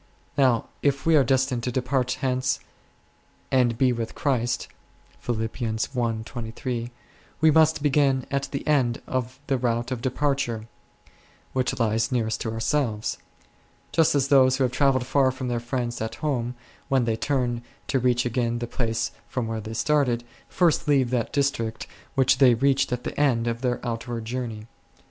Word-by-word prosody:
Now 130 -4 +3 0.2
if 140 -1 +1
we 165 -1 +5
are 145 - +6
destined 130 -1 +1
"to 125 - -1
de 130 - 0
part 125 -1 0
hence, 130 -1 0 0.9
and 120 -3 +3
be 125 0 +3
with 115 -1 -4
Christ 125 -4 0 0.6
1," 115 -2 -1 1.9
we 155 0 +5
must 160 -1 +4
begin 135 -3 +2
at 140 0 0
the 140 - -4
end 130 -6 +2
of 130 0 -3
the 135 -2 0
route 120 +1 -1
of 125 -2 -3
departure 130 -4 -1 0.9
(which 130 -1 0
lies 115 +1 +1
nearest 115 -3 0
to 110 - -2
ourselves); 115 -1 -1 0.7
just 160 0 +3
as 135 -1 +2
those 130 -2 +5
who 135 - +2
have 125 - +1
travelled 130 -2 +2
far 135 0 +3
from 130 -1 -4
their 120 -1 0
friends 120 -1 -3
at 110 - -3
home, 125 -5 -2 0.3
when 135 -3 +3
they 115 -1 +1
turn 120 -1 -1 0.2
to 135 - 0
reach 125 -1 +2
again 120 -1 0
the 120 - -3
place 115 -1 -2 0.2
from 125 -3 -2
which 110 -1 -4
they 110 - -5
started, 130 -3 +1 0.3
first 170 -5 +2
leave 135 -4 +3
that 120 -3 0
district 135 -6 -1 0.3
which 130 -1 +3
they 125 -4 +7
reached 135 +2 +2
at 125 0 -2
the - - -5
end 125 -6 +2
of 115 0 -2
their 125 -2 0
outward 115 0 -4
journey. 115 -3 -4
125 Hz, 160 wpm, -25 LUFS, 120-135 Hz, 1.9 s, they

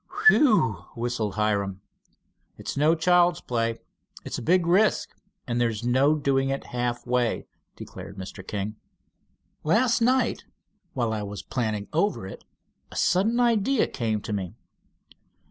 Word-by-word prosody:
"Whew!" 210 - +5
whistled 115 -3 -2
Hiram. 100 -3 0 0.8
"It's - - -5
no 155 +4 +3
child's 175 +1 +3
play. 115 -1 -2 0.4
It's - - -4
a - - -7
big 175 +7 +3
risk, 190 +6 +3 0.4
and 120 -1 -1
there's 115 -2 -1
no 130 +5 +3
doing 135 -2 +1
it 135 0 -2
half 120 0 -2
way," 125 -1 0 0.3
declared 95 +1 -10
Mr. 95 +1 -7
King. 105 +1 -4 0.9
"Last 230 +9 +2
night 250 0 +2 0.5
while 120 -4 -1
I 110 - -2
was 100 -2 -6
planning 110 -4 -2
over 180 - 0
it, 95 - -9 0.5
a - - -11
sudden 210 +7 +2
idea 235 +1 +3
came 110 -3 -2
to 105 - -5
me. 95 -4 -4
120 Hz, 135 wpm, -26 LUFS, 105-175 Hz, 0.9 s, Whew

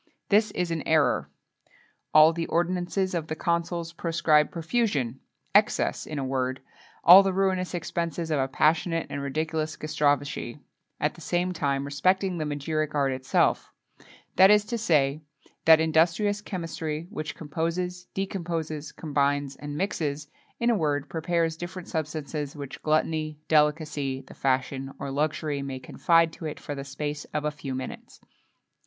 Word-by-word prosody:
This 215 +1 +4
is 180 -1 -1
an 165 -2 -1
error. 155 -6 +2 0.8
All 155 +1 +7
the 165 0 -3
ordinances 180 +2 0
of 165 -3 -2
the 155 - -3
consuls 170 0 -1
proscribed 165 -3 +2
profusion, 165 - -1 0.3
excess - - +2
in 155 - -5
a 140 - -1
word, 130 0 -1 0.4
all 180 +3 +10
the 195 -1 +1
ruinous 185 -1 0
expenses 170 -1 -3
of 150 - +2
a 135 - +1
passionate 165 +4 +1
and 140 - -3
ridiculous 155 +2 -2
gastrophagy,[XXII 145 -5 0
6] 145 - -20 0.4
at 150 - +1
the 170 - -14
same 180 +3 0
time, 140 -4 -1
respecting 185 +5 +1
the 155 - -1
magiric 150 +1 -2
art 140 -2 +2
itself; 130 0 +1 0.7
that 190 +1 +8
is 210 0 +5
to 235 +2 -3
say, 150 -7 +2 0.4
that 160 -1 +8
industrious 165 +6 +2
chemistry 165 -5 -4
which 155 -7 -5
composes, 170 +4 -3
decomposes, 165 -6 -3
combines, 145 -2 -1
and 145 0 -6
mixes 150 -6 -2 0.3
in 235 0 +3
a - - +3
word, 145 -5 -1
prepares 165 0 0
different 175 +1 -7
substances 150 -2 -4
which 140 -2 -8
gluttony, 155 0 0
delicacy, 150 -3 +1
the 130 - -14
fashion, 135 0 -1
or 140 - -5
luxury 150 0 -1
may 135 -1 -4
confide 165 +5 +2
to 165 - -9
it 155 - -5
for 145 - -6
the 140 -1 -5
space 145 +2 -5
of 150 0 -1
a 150 - +1
few 140 -3 -6
minutes. 130 0 -7
155 Hz, 150 wpm, -27 LUFS, 145-170 Hz, 0.8 s, all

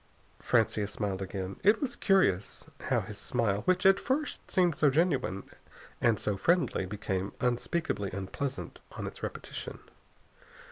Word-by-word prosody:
Francia 110 -3 +2
smiled 100 -2 -3
again. 95 0 -4
It 210 +3 +5
was 260 -4 -2
curious 190 - +2 0.2
how - - +2
his - - -8
smile, 105 -3 0
which 185 0 +2
at 195 0 +7
first 290 +3 -2
seemed 180 -3 +3
so 150 0 +4
genuine 135 - +1 0.6
and 115 -4 +3
so 105 -2 -1
friendly, 165 - +2
became 95 -1 -3
unspeakably 120 - 0
unpleasant 100 +9 -4
on - - -5
its - - -7
repetition. - - -6
120 Hz, 135 wpm, -30 LUFS, -, 0.6 s, at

